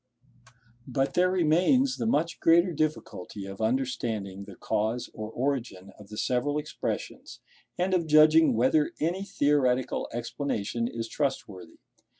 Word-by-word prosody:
But 135 +1 -1
there 180 +1 +3
remains 185 - +2
the - - -2
much 165 -4 0
greater 170 +2 +4
difficulty 150 - -3
of 95 +2 -8
understanding 110 -5 -2
the 100 -2 -11
cause 110 +3 -2
or 110 0 -6
origin 120 -7 -3
of 105 - -13
the 105 - -9
several 130 +6 0
expressions, 150 - -5 0.4
and 185 +1 0
of 170 -3 +1
judging 155 -2 +6
whether 130 +6 +2
any 175 +5 -1
theoretical 140 -8 +1
explanation 120 -2 -3
is 115 -1 -5
trustworthy. 105 - -4
135 Hz, 130 wpm, -27 LUFS, 110-160 Hz, 0.4 s, judging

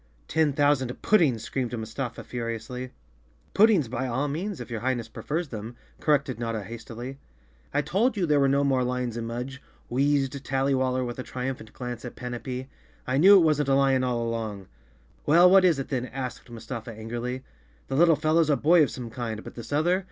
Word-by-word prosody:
"Ten 160 -2 +2
thousand 140 -3 +1
puddings!" 145 - +3
screamed 120 +1 -3
Mustafa 115 +2 -5
furi¬ 115 -2 -3
ously. 125 +3 -7 0.6
"Puddings 205 - +5
by 130 +3 -3
all 130 +4 -1
means, 175 +7 -3
if - - -8
your 115 - -2
Highness 120 -2 -1
prefers 155 +7 -4
them," 110 +1 -7 0.2
corrected 140 -5 +1
Notta 115 -3 -2
hastily. 120 +5 -8 0.5
"I 145 +1 +1
told 205 - +1
you 185 - +1
there 150 -3 +3
were 140 - +4
no 140 +1 +3
more 135 -2 +2
lions 125 -2 -2
in 115 -1 -4
Mudge," 125 +3 -5 0.3
wheezed 140 +1 +1
Tazzy 135 +1 +1
waller 130 -1 0
with 120 +1 -6
a - - -1
triumphant 125 -3 -5
glance 125 -2 -6
at 125 - -7
Pan 125 -1 -6
apee. 125 +1 -5 0.2
" - - -32
I 130 +2 0
knew 195 +5 +9
it 185 - +7
wasn't 150 -2 +2
a 135 - +4
lion 135 -1 +3
all 120 -2 0
along." 110 -4 -4 0.6
"Well, 170 +4 +7
what 190 +1 +7
is 175 -5 +4
it 135 - -4
then?" 125 -2 -2
asked 130 -1 -6
Mustafa 115 0 -7
angrily. 120 +4 -5 0.4
"The 135 - -3
little 165 +2 +6
fellow's 155 +1 +2
a 145 - +3
boy 170 +2 +5
of 145 - +3
some 120 -3 -7
kind, 110 -2 -4
but - - -9
this 115 +1 -9
other?" 170 +6 +2
130 Hz, 200 wpm, -26 LUFS, 120-145 Hz, 0.6 s, knew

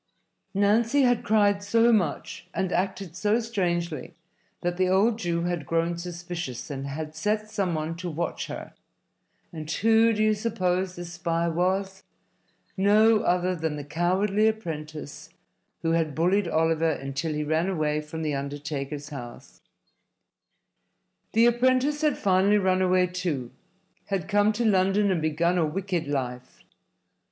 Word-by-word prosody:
Nancy 225 +7 +3
had 245 -2 +2
cried 205 -2 +3
so 230 +3 +3
much 180 -9 -1
and 190 -1 -1
acted 190 -2 -2
so 210 +4 +1
strangely 175 - -2 0.5
that 175 0 -2
the 185 0 +2
old 215 +5 +3
Jew 170 -3 -1
had 175 -5 -2
grown 165 +1 0
suspicious 175 -6 -6
and 135 0 -4
had 155 +2 -5
set 210 +5 -1
some 195 -6 -1
one 155 +1 -3
to 180 0 -4
watch 170 +2 -3
her. - - -7 0.8
And 155 -2 -7
who 225 +5 +4
do 215 -1 +1
you 215 0 +4
suppose 185 -4 -1
this 175 0 -7
spy 170 -1 -1
was? 190 +3 -1 0.7
No 210 +3 +5
other 180 0 +1
than 160 -2 -2
the 145 - -5
cowardly 190 +7 +1
apprentice 155 -8 -5 0.5
who 165 - +1
had 160 -3 0
bullied 180 +4 +2
Oliver 165 0 +2
until 140 +3 -3
he 150 - -1
ran 160 +4 0
away 155 -4 0
from 160 +1 -6
the 150 -1 -1
undertaker's 145 +1 -4
house. 120 -5 -10 1.7
The 230 +1 +5
apprentice 255 +5 +2
had 300 -3 +2
finally 195 +2 +3
run 185 -2 +2
away, 185 0 +3
too, 175 -9 -3 0.6
had 195 -5 -2
come 205 0 +3
to 235 +2 -1
London 195 0 +3
and 175 -4 0
begun 170 +3 +1
a - - +3
wicked 180 -1 -2
life. 125 -3 -4
180 Hz, 145 wpm, -26 LUFS, 160-205 Hz, 1.7 s, No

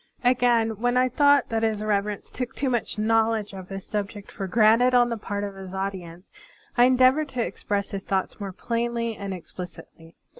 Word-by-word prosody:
Again, 240 -3 +3
when 245 +1 +1
I 255 0 +3
thought 285 +1 +4
that 225 -1 0
His 220 -2 0
Reverence 205 -1 -1
took 250 -1 -5
too 270 -2 -1
much 240 -2 -2
knowledge 220 -1 +1
of 190 -1 -9
his 195 -1 -6
subject 205 -1 -5
for 195 -1 -5
granted 230 +5 +4
on 245 -1 +5
the 235 - -1
part 205 -1 -4
of 200 -1 -4
his 190 -1 -9
audi 195 -1 -2
ence, 170 +2 -13 0.4
I 245 - +6
endeavored 260 +4 +4
to 250 -3 -1
express 200 -1 -3
his 195 -1 -4
thoughts 190 +1 -2
more 200 -2 -5
plainly 230 +2 -2
and 200 -1 -6
explicitly. 175 -2 -10
215 Hz, 190 wpm, -25 LUFS, 195-240 Hz, 0.4 s, I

